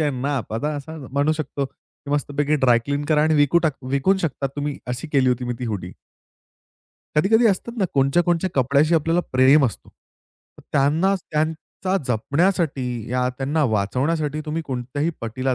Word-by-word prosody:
आणि 145 -5 0
नाप, 140 -6 -2
आता 150 +6 -1
असं 145 -1 -8
म्हणू 145 +2 +2
शकतो 145 -2 -3
की, 140 +2 -15
"मस्तपैकी 145 +1 0
ड्राय 120 -1 +6
क्लीन 145 +1 -2
करा 150 -1 +3
आणि 155 0 +3
विकून 145 +4 +4
टाक 150 -4 +1
विकून 140 +8 +2
शकता 145 -5 -2
तुम्ही," 145 0 -3
अशी 125 +6 -4
केली 135 -2 +3
होती 125 0 -1
मी 120 - -2
ती 125 - -4
हुडी. 95 -5 -4 1.2
कधी-कधी 220 +9 +4
असतात 225 +4 -1
ना, 195 - +2
कोणाच्या 140 +5 +3
ना - - -1
कोणाच्या 175 +1 +1
कपड्याशी 140 +5 +3
आपल्याला 165 +2 +2
प्रेम 135 +3 +5
असतो. 115 - -7
तर - - -26
त्यांना 155 +8 +3
त्यांचा 160 +3 -2
जपण्यासाठी, 140 - 0 0.2
ह्या 125 +1 0
त्यांना 145 +3 0
वाचवण्यासाठी, 145 +9 0
तुम्ही 160 +2 -2
कोणत्याही 135 +5 -2
पटीला 130 +3 -2
145 Hz, 165 wpm, -22 LUFS, 130-160 Hz, 1.2 s, ड्राय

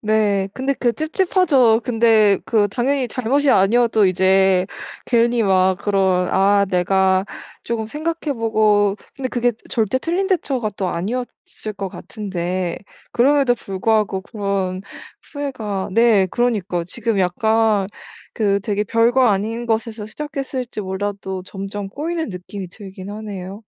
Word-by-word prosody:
네. 210 -3 +1
근데 270 +1 -1
그 240 -2 +1
찝찝하죠. 310 - +2
근데 225 -4 +3
그 210 -3 +2
당연히 255 +4 0
잘못이 275 +3 +1
아니어도 220 +1 +4
이제 190 0 +3 0.4
괜히 235 -1 +2
막 190 -1 +3
그런 190 -3 +1
아 200 +1 +4
내가 190 +1 +2 0.4
쪼금 220 -2 -3
생각해 315 +2 -3
보고 215 -4 +2 0.2
근데 260 -2 -3
그게 245 0 +1 0.2
절대 225 +2 0
틀린 360 +6 -1
대처가 270 - 0
또 190 - -1
아니었을 215 +2 -5
것 195 -1 -3
같은데 185 -4 -4 0.3
그럼에도 270 0 +3
불구하고 195 0 0
그런 195 -3 -3 0.5
후회가 230 -10 -4
네 225 -4 +4
그러니까요. 200 -6 -1
지금 225 +3 -2
약간 210 +2 +2 0.5
그 200 -2 +1
되게 205 0 -1
별거 235 +4 +3
아닌 220 +3 0
것에서 220 -1 -2
시작했을지 265 -3 -5
몰라도 190 -1 -4
점점 195 +1 -6
꼬이는 320 +7 -3
느낌이 185 +1 -7
들긴 190 0 -10
하네요. 205 -1 -7
215 Hz, 285 characters per minute, -20 LUFS, 195-245 Hz, 0.5 s, 아니어도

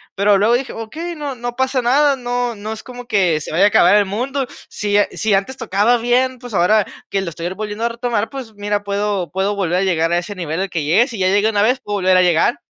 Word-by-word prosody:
pero 200 0 +3
luego 215 +4 +3
dije: 255 +2 -1
"Okey, 320 +10 -6
no 290 -3 -5
no 240 0 -5
pasa 260 0 +1
nada, 280 +4 +3
no 245 -1 -2
no 210 +2 -6
es 220 - -9
como 245 -1 -10
que 180 -7 +2
se - - -7
vaya 185 +5 +4
a - - +7
acabar 205 - +5
el 205 -1 +4
mundo". 255 +7 -2 0.2
Sí, 205 0 -1
sí, 215 -2 -1
antes 200 +8 0
tocaba 210 +6 +2
bien, 250 +2 +1
pues 245 -3 -10
ahora 195 +3 +3 0.2
que 195 - -1
lo 180 - -4
estoy 170 +2 -5
volviendo 215 +2 -5
a - - +1
retomar, 235 -2 -2
pues 260 -5 -8
mira, 205 0 -2
puedo 200 -4 -1
puedo 195 +2 -1
volver 180 -2 0
a - - +1
llegar 165 -3 +1
a - - +3
ese 200 +3 -7
nivel 170 0 -3
al 195 - -2
que 165 -4 -2
llegué, 210 - +3
si 230 - -7
ya 185 - +2
llegué 205 +3 +3
una 205 -1 +1
vez, 250 +4 +2
puedo 205 0 -3
volver 185 -1 +3
a - - +5
llegar. 180 +7 +2
210 Hz, 255 wpm, -18 LUFS, 195-245 Hz, 0.2 s, a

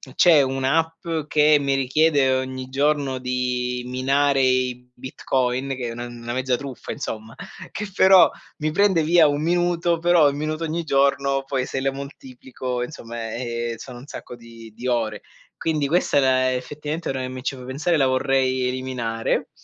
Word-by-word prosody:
c'è 165 -5 +6
un'app 135 +6 0 0.2
che 150 0 +5
mi 140 -1 0
richiede 135 0 +2
ogni 130 0 -3
giorno 140 -1 0
di 125 -1 -2
minare 135 +2 +1
i 125 -1 0
Bitcoin, 130 0 -2
che 125 -2 -4
è - - -5
una 120 +1 -6
una 120 0 -7
mezza 130 0 0
truffa, 135 0 -7
insomma, 110 +1 -6 0.4
che 210 -1 -5
però 190 -1 +7 0.3
mi 155 -1 -1
prende 190 -1 +3
via 165 0 +5
1 145 +1 -1
minuto, 175 0 +1
però 170 -3 +5
1 140 - -4
minuto 155 +2 -3
ogni 165 +1 -2
giorno 140 -1 +1
poi 135 -2 -2
se 135 - -3
la 135 0 0
moltiplico, 130 -2 -6
insomma, 115 -4 -6
eh, 120 -1 -3
eh - - -6
sono 120 +1 -10
un 135 - -13
sacco 125 - -9
di 115 -1 -13
di 125 +3 -6
ore. 110 -4 -1 0.4
Quindi 155 -3 0
questa 165 -2 +1
è - - +7
la 130 -1 +3
effettivamente, 150 +5 -4
ora 135 - -2
che 130 - -3
mi 130 0 -8
ci 135 - -2
fai 125 - -10
pensare, 145 +7 0
la 135 - +3
vorrei 130 -1 +1
eliminare. 125 -3 -2
130 Hz, 175 wpm, -23 LUFS, 125-150 Hz, 0.4 s, però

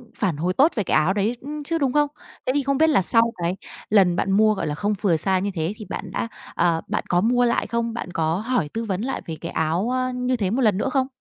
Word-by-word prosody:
phản 180 -7 -1
hồi 180 +4 0
tốt 290 - +4
về 210 - 0
cái - - 0
áo 165 +5 +2
đấy, 215 +4 0
ưm, 295 +2 -6
chứ, 330 +3 -1
đúng 275 -4 0
không? 295 0 +3 0.4
Thế 255 - +1
thì 285 - +2
không 275 0 0
biết 320 0 +4
là 260 -10 +4
sau 230 +4 +3
cái 175 +2 0 0.3
lần 190 -4 +4
bạn 195 - 0
mua, 215 +2 +4
gọi 190 - -3
là, 145 - -2
không 205 +6 0
vừa 185 -6 +3
size 185 +3 +1
như 200 0 -1
thế 165 +5 -1
thì 215 - -9
bạn 185 - -5
đã, 230 - -2 0.3
ờ 170 -1 +2
bạn - - -1
có 175 0 +3
mua 245 +2 +3
lại 235 - +1
không? 235 +1 -1
Bạn 190 -6 -5
có 160 0 0
hỏi 220 -10 -1
tư 225 +1 -4
vấn 195 -2 -2
lại 270 +3 -3
về 160 - -5
cái 170 - -5
áo, 165 +8 0
ơ, 255 0 0
như 250 0 0
thế 200 -5 -1
1 255 +5 0
lần 210 -5 +3
nữa 265 - 0
không? 265 -1 +1
215 Hz, 285 wpm, -23 LUFS, 180-250 Hz, 0.4 s, tốt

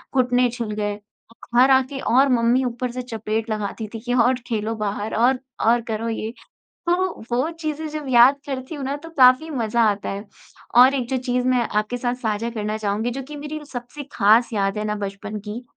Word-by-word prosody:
घुटने 250 -1 +3
छिल 235 -3 -4
गए। 205 -1 -2
और 225 +3 -6
घर 265 +1 +6
आके 265 +1 +2
और 265 +3 +3
मम्मी 245 +1 +3
ऊपर 245 0 -3
से 250 +1 -4
चपेट 225 -2 -3
लगाती 215 +1 -3
थी 225 - -5
कि 245 - -1
और 250 +1 +4
खेलो 225 -1 -2
बाहर 210 0 -3
और 250 +3 +3 0.3
और 235 +1 +4
करो 225 +1 -2
ये। 220 0 -3 0.6
तो 345 - +4 0.4
वो 255 +7 +1
चीज़ें 315 -2 -4
जब 305 -1 -6
याद 250 +2 +6
करती 265 +1 -5
हूँ 285 -3 -5
ना, 275 +2 -2
तो 330 +3 -11
काफ़ी 260 +1 +5
मज़ा 235 -4 0
आता 200 -1 -4
है। 200 +1 -5 0.5
और 255 +3 +7
एक 250 -3 -2
जो 265 - 0
चीज़ 250 0 -1
मैं 250 -1 +3
आपके 215 +3 -1
साथ 245 0 -1
साझा 220 +1 -1
करना 215 -2 -3
चाहूँगी 215 +2 -1
जो 270 +3 -5
कि 300 - -7
मेरी 300 +1 -5
र 300 - -12
सबसे 245 +3 -7
ख़ास 225 +3 +4
याद 200 -1 0
है 210 - -2
ना 210 0 -1
बचपन 205 +1 -5
की, 220 +4 -5
240 Hz, 210 wpm, -22 LUFS, 215-260 Hz, 0.6 s, और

